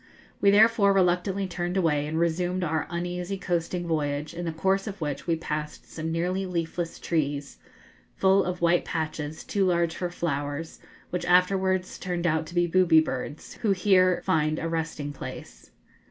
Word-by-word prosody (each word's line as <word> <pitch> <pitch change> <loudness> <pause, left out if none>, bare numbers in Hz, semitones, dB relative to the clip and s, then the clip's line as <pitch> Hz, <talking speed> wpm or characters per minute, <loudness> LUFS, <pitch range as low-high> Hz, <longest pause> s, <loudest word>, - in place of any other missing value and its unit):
We 200 - +6
therefore 210 0 +5
reluctantly 190 +1 +1
turned 175 +1 -3
away 150 -5 +1
and 160 +1 -3
resumed 175 +2 0
our 160 -1 -1
uneasy 180 +2 -3
coasting 175 -1 -2
voyage, 150 -1 -1
in 175 +1 -5
the 165 - -1
course 190 +5 0
of 200 -1 -6
which 145 -2 -4
we 165 - +2
passed 150 -2 -5
some 160 0 -4
nearly 180 +3 -1
leafless 170 -1 -3
trees, 145 -3 -2 0.6
full 190 0 +4
of 180 0 -4
white 170 +1 +3
patches, 155 -1 -4
too 200 - 0
large 170 -3 +2
for 180 - -2
flowers, 145 -2 -3 0.3
which 180 - -2
afterwards 185 +1 +2
turned 175 -2 -3
out 160 -1 +1
to 170 - -10
be 175 0 +3
booby 175 -2 +5
birds, 145 0 -4
who 210 -4 +3
here 185 -2 +3
find 155 -4 +1
a 165 - -2
resting 160 -3 -3
place. - - -9
175 Hz, 165 wpm, -26 LUFS, 160-185 Hz, 0.6 s, We